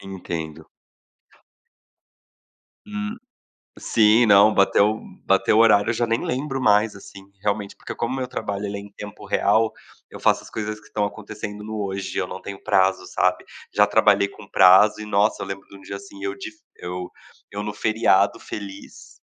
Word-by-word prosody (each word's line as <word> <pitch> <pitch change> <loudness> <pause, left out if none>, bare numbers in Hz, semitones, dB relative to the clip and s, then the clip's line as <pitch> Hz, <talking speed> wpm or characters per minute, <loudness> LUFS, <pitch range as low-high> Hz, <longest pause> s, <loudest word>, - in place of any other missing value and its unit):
Entendo. 85 -5 -7 2.2
Hum, 210 +1 -5 0.6
sim, 110 +2 +4
não, 105 +1 +6
bateu 105 +2 +3 0.3
bateu 95 +2 +3
o - - +5
horário, 105 -2 +5
eu 120 - +1
já 120 +1 0
nem 115 0 -1
lembro 135 +1 -3
mais, 105 -2 +3
assim, 100 0 -12 0.2
realmente, 100 0 -2
porque - - -8
como 120 +2 -2
o 135 - -3
meu 130 - -3
trabalho 100 -4 -4
ele 100 0 -4
é - - -5
em 100 - -13
tempo 105 0 -10
real, 110 +2 +2 0.4
eu - - -10
faço - - +2
as - - -13
coisas 105 0 -4
que - - -22
estão 105 -1 -1
acontecendo 105 0 -7
no 110 -1 -4
hoje 95 0 -5
e - - 0
eu - - -3
não - - -7
tenho 100 -1 -8
prazo, 95 0 +2
sabe. - - 0 0.3
Já 105 0 +4
trabalhei 100 -1 +4
com - - -14
prazo 95 +3 +6
e, 105 - -6
nossa, 105 +1 +1
eu - - -5
lembro 95 0 -7
de - - -15
um 95 - -14
dia, 100 - -7
assim, 100 0 -11
eu 100 0 -3
de 100 - -7 0.2
eu 90 0 -6 0.4
eu 100 +1 -4
no 105 0 -4
feriado 105 -3 +2
feliz, 100 -1 -10
105 Hz, 185 wpm, -23 LUFS, 100-110 Hz, 2.2 s, não